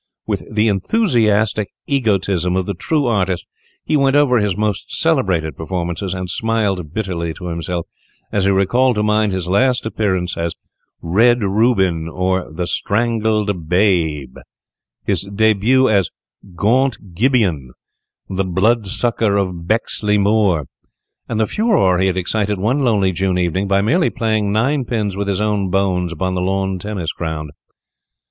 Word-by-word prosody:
With - - -4
the 110 +1 +2
enthusiastic 110 - +1 0.2
egotism 100 - 0
of 95 -1 0
the 100 - -3
true 145 - -1
artist, 95 -7 0 0.4
he 155 - 0
went 140 -1 +3
over 140 -5 +4
his 105 -3 0
most 105 -1 -2
celebrated 80 -6 +1
performances, 85 +2 -3
and 95 0 -4
smiled 100 -6 -1
bitterly 85 -5 -3
to 90 -2 -6
himself 85 +1 -3 0.5
as 100 -2 +1
he - - +3
recalled 120 +7 +2
to 105 - 0
mind 105 0 +2
his 95 -2 -3
last 125 +7 +2
appearance 95 -5 -1
as 85 0 -2 0.5
"Red 115 +7 +3
Reuben, 95 -5 +1
or 90 0 -1
the 90 +3 -3
Strangled 105 -4 -1
Babe," 85 -8 +1 0.6
his - - -1
début 110 +5 +3
as 95 -4 +2 0.5
"Guant 110 -1 0
Gibeon, 100 - +1 0.6
the 95 0 -1
Blood 100 +4 +1
sucker 110 0 0
of 90 -4 -3
Bexley 105 -1 0
Moor," 100 -6 +2 0.6
and 110 - -1
the 110 - +3
furore 195 - +2
he 95 - +2
had 95 -1 -1
excited 100 +2 -1
one 120 +9 +1
lovely 105 -6 +2
June 95 0 0
evening 90 +2 0
by 100 0 +2
merely 165 - +2
playing 110 -4 -1
ninepins 115 -3 0
with 100 0 -3
his 100 -1 0
own 105 -3 0
bones 90 -2 0
upon 95 +3 -2
the 90 - -1
lawn 95 0 -1
tennis 95 -5 -4
ground. 80 -3 -5
100 Hz, 145 wpm, -18 LUFS, 90-110 Hz, 0.6 s, over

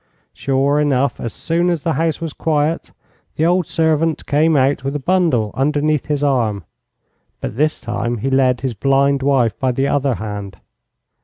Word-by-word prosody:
Sure 140 +2 +1
enough, 140 -2 +1
as 115 - -4
soon 170 +7 -1
as 170 -4 -1
the 165 - 0
house 165 0 0
was 165 -3 -5
quiet 155 +1 -1 0.5
the 160 - +1
old 175 -1 +2
servant 160 0 0
came 155 +2 +2
out 135 0 +2
with 135 +1 -3
a - - -1
bundle 145 - +1
underneath 150 +1 0
his 145 -1 -1
arm; 115 -9 0 0.8
but - - -5
this 155 +4 0
time 120 0 -3
he 135 +5 -2
led 130 -2 +2
his 130 -2 -2
blind 135 +3 +2
wife 130 -5 +2
by 130 -1 +1
the 135 +3 0
other 140 -3 +1
hand. 105 -4 -6
140 Hz, 170 wpm, -18 LUFS, 130-155 Hz, 0.8 s, old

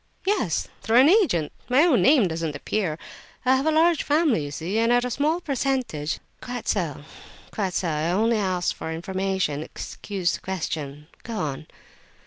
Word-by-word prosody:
"Yes, 380 - 0
through 225 +2 +2
an 265 +4 +7
agent. 330 - +3 0.2
My 260 +5 +5
own 325 -9 +4
name 265 -7 +5
doesn't 160 -2 -3
appear. 160 +1 -2 0.5
I 260 +1 +5
have 270 +4 0
a - - +4
large 325 +1 +4
family, 290 - +2
you - - -5
see, 170 +9 -2
and 230 +1 +3
at 245 0 +3
a 250 - -3
small 300 +7 +1
percentage—" 260 - -1 0.2
"Quite 245 -2 -6
so, 165 -8 -1 0.5
quite 195 -4 -2
so. 180 - 0
I 155 +1 -1
only 220 +5 +2
asked 185 -3 0
for 160 - -6
information—excuse 185 +1 -2
the - - -4
question. 150 -6 -4 0.2
Go 230 - -6
on." 150 -1 -3
200 Hz, 165 wpm, -24 LUFS, 160-260 Hz, 0.5 s, an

